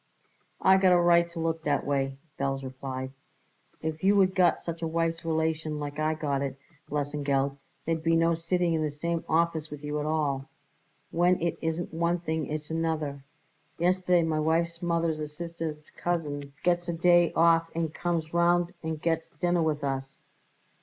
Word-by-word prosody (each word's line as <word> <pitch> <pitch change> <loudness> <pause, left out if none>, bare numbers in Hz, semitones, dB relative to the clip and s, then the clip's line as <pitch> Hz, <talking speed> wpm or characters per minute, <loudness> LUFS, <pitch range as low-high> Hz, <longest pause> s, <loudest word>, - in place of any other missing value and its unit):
"I 190 - +6
got 190 -1 +5
a 175 - +5
right 170 0 +4
to 170 0 -7
look 165 0 -1
that 150 -2 0
way," 135 -1 0 0.2
Belz 135 0 -1
replied. 130 0 -5 0.7
"If 160 +1 -3
you 200 +2 +5
would 190 -2 +4
got 180 -3 +3
such 170 0 -6
a 165 - -1
wife's 165 0 -1
relation 160 -1 -1
like 145 0 -5
I 155 +1 +1
got 145 -3 -1
it, 135 -1 -3 0.3
Lesengeld, 140 -1 0 0.3
there'd 165 0 0
be 165 +1 +2
no 165 0 +3
sitting 170 +1 0
in 160 - +1
the 155 - 0
same 165 +3 -2
office 160 -1 +1
with 150 0 -9
you 150 0 -2
at 150 - -2
all. 145 -4 -1 0.6
When 175 +2 +3
it 170 -1 0
isn't 160 +1 -2
one 170 +1 +1
thing 160 -2 -2
it's 155 +1 -5
another. 155 -4 -2 0.5
Yesterday 180 0 +3
my 160 -1 0
wife's 165 +2 0
mother's 170 -2 0
a 150 - -3
sister's 160 -1 -6
cousin 145 -5 -3
gets 175 0 +2
a 170 - -1
day 175 0 +4
off 165 0 +4
and 165 -2 -1
comes 165 -2 -2
round 175 +1 +3
and 160 -1 -3
gets 165 0 -1
dinner 175 -1 0
with 155 -2 0
us. 135 -1 -3
160 Hz, 175 wpm, -28 LUFS, 150-170 Hz, 0.7 s, I